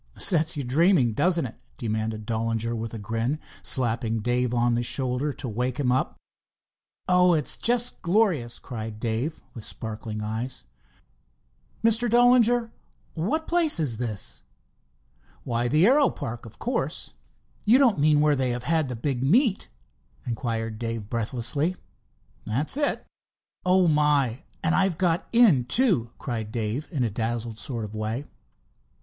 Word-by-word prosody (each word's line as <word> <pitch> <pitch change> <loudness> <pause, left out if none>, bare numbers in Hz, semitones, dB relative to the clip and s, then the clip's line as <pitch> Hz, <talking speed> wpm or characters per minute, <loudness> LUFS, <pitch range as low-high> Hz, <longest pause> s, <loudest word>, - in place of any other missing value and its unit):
"Sets 160 -4 +4
you 140 - -2
dreaming, 135 - +3
does 175 +9 +3
it?" 130 -8 -2 0.2
demanded 110 -1 -3
Dollinger 115 +1 -2
with 115 0 -5
a - - -5
grin, 115 +7 -3 0.2
slapping 115 -2 0
Dave 125 +1 0
on 120 0 +1
the 120 - 0
shoulder 130 +3 +1
to 130 - -6
wake 125 +3 -2
him 130 -3 +1
up. 130 +1 -1 0.9
"Oh, 180 -1 +4
it's 150 -4 +2
just 240 +1 +2
glorious!" 170 - +1
cried 110 -4 -7
Dave, 120 +8 -3
with 115 - -8
sparkling 110 -1 -5
eyes. 110 - -4 1.2
"Mr. 230 +1 +3
Dollinger, 240 0 +4 0.4
what 280 - -2
place 335 - +4
is 135 -8 0
this?" 110 -5 -3 1.0
"Why, 120 0 -1
the 155 +7 +4
aero 275 +5 +4
park, 120 -4 -7
of 110 - -15
course." 250 - -3 0.5
"You 225 +4 +5
don't 250 - +3
mean 150 0 +3
where 150 -1 +3
they 130 -2 0
have 120 0 -3
had 155 0 +1
the 125 - -4
big 125 +1 -3
meet?" 210 - +2 0.6
inquired 115 -2 -4
Dave 115 -3 -4
breathlessly. 120 +8 0 0.7
"That's 130 - +1
it." 290 0 -1 0.6
"Oh, 185 0 +4
my—and 150 0 0
I've 190 -3 +1
got 175 -1 0
in, 210 - +5
too!" 160 - +3
cried 110 -4 -5
Dave 115 +5 -3
in 145 -8 -2
a 115 - -1
dazzled 115 0 -3
sort 115 -5 -4
of 105 - -10
way. 110 +6 -4
125 Hz, 145 wpm, -25 LUFS, 115-170 Hz, 1.2 s, You